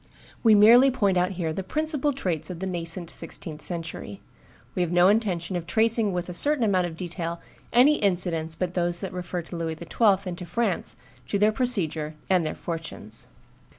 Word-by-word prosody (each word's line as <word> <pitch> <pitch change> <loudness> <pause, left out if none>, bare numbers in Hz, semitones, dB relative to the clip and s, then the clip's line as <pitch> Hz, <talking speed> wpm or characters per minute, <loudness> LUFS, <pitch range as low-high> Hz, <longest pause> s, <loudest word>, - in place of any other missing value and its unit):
We 220 -2 +6
merely 235 +6 +7
point 205 -7 +1
out 180 +2 +1
here 170 -3 -3
the 190 - -3
principal 300 - -1
traits 175 - -3
of 180 - -6
the 190 - -4
nascent 170 -1 -3
sixteenth 155 -2 -3
century; 165 - -3 0.5
we 180 - -1
have 175 -2 -1
no 175 +1 +5
intention 190 -5 0
of 170 -1 -4
tracing 225 -1 +2
with 180 -1 -3
a 180 - -6
certain 290 - +2
amount 185 -4 +2
of 165 -1 -9
detail 170 -1 -4 0.3
any 270 +5 +5
incidents 170 -5 -1
but 180 +1 -3
those 175 -1 0
that 190 -2 -5
refer 180 -1 -4
to 170 - -9
Louis 165 -1 -3
XII. 195 +3 +1
and 180 - -3
to 180 - -6
France, 185 - -1 0.3
to 200 - 0
their 210 +2 +4
procedure 170 - +1 0.2
and 180 -2 +4
their 155 - -3
fortunes. 165 -10 -4
180 Hz, 185 wpm, -25 LUFS, 165-210 Hz, 0.5 s, merely